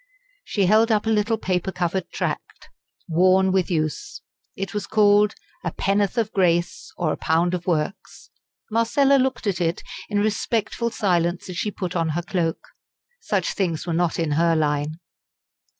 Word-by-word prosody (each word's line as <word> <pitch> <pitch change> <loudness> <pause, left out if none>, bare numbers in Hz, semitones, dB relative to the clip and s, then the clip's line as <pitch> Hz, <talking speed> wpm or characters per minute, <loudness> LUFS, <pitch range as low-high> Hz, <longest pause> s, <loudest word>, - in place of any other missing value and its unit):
She 200 -3 0
held 220 +4 +4
up 215 0 +2
a 225 - +1
little 220 +1 +1
paper 185 -2 -1
covered 180 0 -2
tract - - -5 0.4
worn 185 +3 +4
with 185 -2 +1
use. 160 - -3 0.3
It 195 0 -5
was 210 -1 -3
called 210 -1 +4 0.3
"A 170 - -1
Pennorth 200 +5 0
of 220 -2 0
Grace, 175 -3 +1
or 165 -3 0
a - - -2
Pound 170 +2 +1
of 175 0 -4
Works?" 170 +3 -3 0.4
Marcella 270 +5 +3
looked 260 -3 0
at 190 -3 -1
it 170 +1 -1 0.3
in 205 - -1
respectful 215 +2 0
silence 180 -5 0
as 175 - -7
she 210 - -1
put 185 -3 -5
on 165 -2 +1
her 175 - -2
cloak. 170 -2 -2 0.5
Such - - -1
things 170 -5 -1
were 170 - -2
not 170 0 +1
in 165 -3 -1
her 165 +2 +3
line. 150 0 0
185 Hz, 165 wpm, -23 LUFS, 170-210 Hz, 0.5 s, held